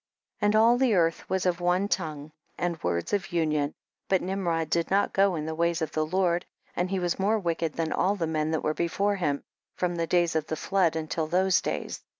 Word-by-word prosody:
46. - - 0
And 210 - +2
all 235 +2 +5
the 255 -5 +3
earth 165 -2 +1
was 190 -1 0
of 175 -1 0
one 180 +3 +2
tongue 155 -6 -3 0.3
and 175 -2 -2
words 85 - -2
of 200 -2 -1
union, 155 -4 0 0.3
but 190 -2 +2
Nim 190 0 -2
rod 165 -1 0
did 170 -1 +1
not 200 +1 +2
go 195 -2 +3
in 155 -2 -3
the 160 - -3
ways 170 +1 +1
of 160 - -2
the 155 - 0
Lord, 175 +1 +1 0.3
and 180 +1 0
he 195 - -1
was 175 -1 -1
more 210 +3 +2
wicked 170 -5 -1
than 160 -1 -2
all 195 +3 +2
the 175 -5 -1
men 155 -1 -1
that 160 -1 -1
were 155 - +1
before 200 +5 0
him, 145 -6 -1 0.3
from 175 -1 -1
the 165 0 -1
days 175 -2 +2
of 155 -1 0
the 160 - -2
flood 180 -2 +1
until 160 0 -2
those 185 +2 +3
days. - - -4
170 Hz, 230 wpm, -27 LUFS, 160-190 Hz, 0.3 s, all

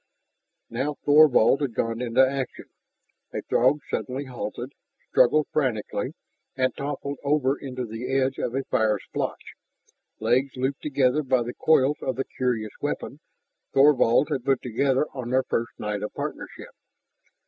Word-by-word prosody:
Now 135 +6 -2
Thorvald 145 -3 +6
had 130 -6 -2
gone 115 +1 -1
into 125 +2 +4
action. 135 -1 -4 0.7
A - - -3
Throg 135 +5 +2
suddenly 135 +2 -3
halted, 125 +1 -6 0.4
struggled 145 +4 +4
frantically, 125 -8 -1 0.4
and 130 -1 0
toppled 140 0 -4
over 140 -2 +2
into 130 -3 -5
the 115 +3 -5
edge 135 0 +1
of 120 - -2
a 135 - 0
fire 110 -4 +1
splotch, - - -5 0.7
legs 130 +2 +1
looped 135 +2 -1
together 135 -1 +2
by 130 -3 +1
the 120 +1 -5
coils 150 -2 +3
of 130 - -2
the 135 - -2
curious 115 -4 -2
weapon - - -3 0.6
Thorvald 135 -1 +5
had 135 -4 -1
put 135 -1 +1
together 130 +4 +1
on 125 -3 -5
their 130 +1 +2
first 115 -2 -2
night 105 -1 -3
of 105 - -4
partnership. - - -6
130 Hz, 145 wpm, -25 LUFS, 120-140 Hz, 0.7 s, Thorvald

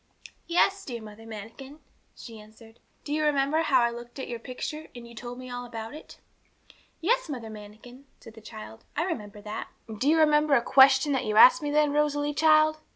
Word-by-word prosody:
'Yes, 390 +3 +2
dear 240 -3 -6
Mother 220 +1 -12
Manikin,' 225 +7 -10 0.4
she 225 -2 -11
answered. 220 +2 -17 0.2
'Do 290 - -4
you 310 0 0
remember 295 +2 +1
bow 260 -3 +4
I 235 - +1
looked 240 +1 -10
at 265 - -6
your 235 -1 -6
picture, 280 +6 -7
and 235 -1 -10
you 235 - -14
told 240 +1 -8
me 255 0 -9
all 245 0 -6
about 225 -1 -8
it?' 305 - -12 0.8
'Yes, 475 +3 0
Mother 235 -6 -6
Manikin,' 215 +5 -13
said 225 - -14
the 225 - -14
child, 110 - -11
'I 310 - 0
remember 210 - -5
that.' 210 0 -6 0.2
'And 220 -2 -9
do 275 - +1
you 320 - +4
remember 300 -2 +4
a 235 - +2
question 265 +1 +5
that 265 - -1
you 215 -1 -2
asked 255 +8 +8
me 295 - -3
then, 295 0 +2
Rosalie, 295 0 0
child! 310 0 +3
255 Hz, 205 wpm, -26 LUFS, 225-300 Hz, 0.8 s, asked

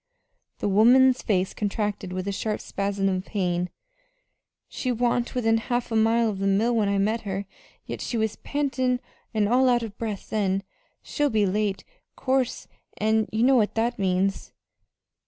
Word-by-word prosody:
The - - -2
woman's 245 +6 +5
face 190 -4 0
contracted 205 -2 -2
with 185 +1 -4
a - - 0
sharp 210 +2 -2
spasm 200 0 -2
of 185 -1 0
pain. 180 -3 -1 1.0
"She 255 - -3
wa'n't 240 0 0
within 225 -2 +2
half 240 +1 -2
a - - 0
mile 225 +1 +3
of 205 -3 -3
the 195 - 0
mill 220 +5 +2
when 210 -3 +2
I 200 - +1
met 215 +4 +1
her, 200 -1 -4 0.4
yet - - -6
she 240 - -2
was 220 -1 -1
pantin' 260 -3 -1 0.3
an' 215 -3 +1
all 255 +3 +4
out 240 -1 +2
o' 225 - -4
breath 210 -1 -6
then. 195 -2 0 0.4
She'll 295 0 0
be 215 -4 +2
late, 200 0 -1 0.3
'course, 260 -2 -1 0.3
an' 220 0 +1
you 220 +1 +1
know 265 +1 +5
what 215 -3 +1
that 230 +1 0
means." 190 0 0
220 Hz, 170 wpm, -25 LUFS, 195-240 Hz, 1.0 s, woman's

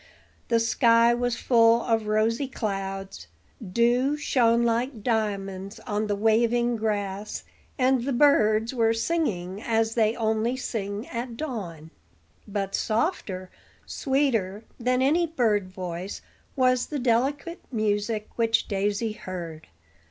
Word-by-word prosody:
The 230 -1 +3
sky 230 0 +4
was 245 0 0
full 230 -1 +4
of 225 -2 0
rosy 225 +5 +1
clouds; 195 -5 -4 0.4
dew 240 +8 +2
shone 235 -5 +2
like 235 0 -1
diamonds 200 -3 -2
on 210 +1 -2
the 205 - 0
waving 235 +3 +2
grass, 205 -2 -3 0.3
and 260 -2 +2
the 275 - -1
birds 230 -4 +3
were 225 -2 +2
singing 215 - -1
as 225 -1 +1
they 225 -1 +2
only 225 +2 0
sing 210 -3 -4
at 235 0 -5
dawn. 180 - -6 0.6
But 200 -1 -3
softer, 215 - -1 0.3
sweeter 235 -8 0 0.2
than 250 +2 +1
any 330 +5 +3
bird 220 - +1
voice 185 +1 -6 0.3
was 255 -2 +2
the 300 - -3
delicate 270 +7 0
music 215 -1 -1
which 230 -1 +2
Daisy 205 +2 -1
heard. 175 -6 -7
225 Hz, 120 wpm, -26 LUFS, 205-245 Hz, 0.6 s, sky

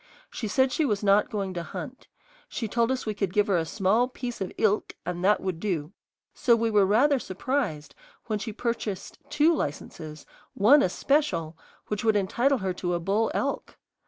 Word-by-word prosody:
She 225 - -4
said 260 +5 +2
she 315 - +1
was 210 -7 0
not 200 +1 +4
going 200 -4 -3
to 175 - -3
hunt; 255 - -8 0.4
she 225 - -3
told 230 +2 +1
us 260 0 -1
we 215 - -1
could 195 -3 -2
give 205 +2 +3
her 195 -4 +2
a 165 - 0
small 215 +6 +2
piece 245 -3 -6
of 190 - -3
"ilk" 215 -1 +1
and 175 +1 -4
that 205 +2 +3
would 185 -4 -3
do; 170 -6 -2 0.4
so 235 - +3
we 230 0 0
were 205 -2 +4
rather 265 +7 +4
surprised 195 - -3 0.3
when 215 -2 -2
she 220 +2 -4
purchased 215 -3 -4
two 300 +3 +4
licenses, 155 - -5 0.3
one 265 +9 +6
a - - +2
special, 175 - 0 0.3
which 210 +1 -3
would 220 -1 +3
entitle 235 +8 +2
her 190 -4 -2
to 175 -1 -2
a - - -1
bull 200 +6 +1
elk. - - -2
210 Hz, 190 wpm, -26 LUFS, 185-240 Hz, 0.4 s, one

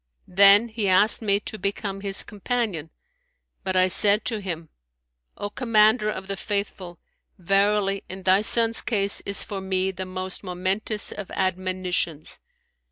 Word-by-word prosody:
Then 200 +4 +6
he 220 -2 -2
asked 205 +5 +3
me 200 -2 +1
to 215 - -8
become 195 0 -4
his 195 -1 -1
companion, 210 - -4 0.7
but 190 -1 -3
I 185 0 +4
said 205 +3 +5
to 220 -4 -3
him, 165 -4 -5 0.7
"O 205 - -5
Commander 215 -2 +2
of 190 -2 -6
the 195 - -3
Faithful, 195 -3 -4 0.4
verily, 195 +2 +1
in 190 +1 -8
thy 190 +2 +3
son's 230 +1 +3
case 200 -3 0
is 200 - 0
for 200 -2 -6
me 190 0 -1
the 185 0 -7
most 185 +1 -5
momentous 190 +4 -2
of 200 -3 -8
admonitions!' 185 -4 -2
195 Hz, 145 wpm, -23 LUFS, 185-210 Hz, 0.7 s, Then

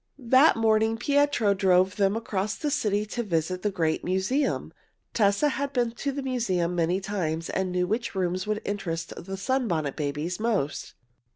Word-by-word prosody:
That 260 +4 +5
morning 220 0 +2
Pietro 285 -4 +2
drove 190 0 +3
them 200 0 +2
across 210 -2 -2
the 300 -2 -2
city 210 -7 0
to 240 +3 -3
visit 180 -3 -1
the 210 - +1
great 165 -5 -1
museum. 190 +10 0 0.4
Tessa 205 +7 +3
had 280 0 -3
been 240 -2 +1
to 280 +4 -3
the 275 0 -4
museum 190 -10 0
many 175 +2 +1
times, 170 -5 -3
and 190 -1 -1
knew 180 0 +1
which 220 +4 -2
rooms 185 +1 -1
would 215 0 -2
interest 170 -5 -3
the 195 +3 -7
Sunbonnet 195 - -1
Babies 150 +5 -3
most. 210 -11 -1
200 Hz, 165 wpm, -26 LUFS, 180-235 Hz, 0.4 s, That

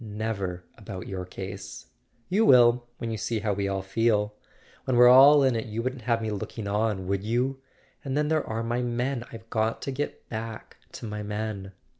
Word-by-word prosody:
"Never 105 -4 -4 0.2
about 100 -4 -7
your 95 -2 -5
case." 95 +1 -8 0.4
"You 200 +5 +2
will—when 120 - +4
you 110 - -2
see 110 +1 -2
how 105 -1 0
we 100 0 -1
all 95 -1 -2
feel. 105 +1 +1 0.5
When 130 -2 +1
we're 125 0 +8
all 140 +3 +8
in 130 -3 +3
it 115 - -3
you 110 +2 -3
wouldn't 130 0 -3
have 115 0 0
me 110 - -2
looking 105 +1 -5
on, 105 -2 0
would 100 +1 -1
you? 125 +5 -1 0.4
And 135 0 -2
then 150 0 +1
there 155 -1 +1
are 115 +1 -3
my 120 +2 -1
men—I've 120 -2 -3
got 110 0 0
to 140 - -3
get 145 +2 -5
back 110 0 -7 0.2
to - - -7
my 105 -1 -4
men." 105 -2 -4
115 Hz, 190 wpm, -27 LUFS, 105-125 Hz, 0.5 s, we're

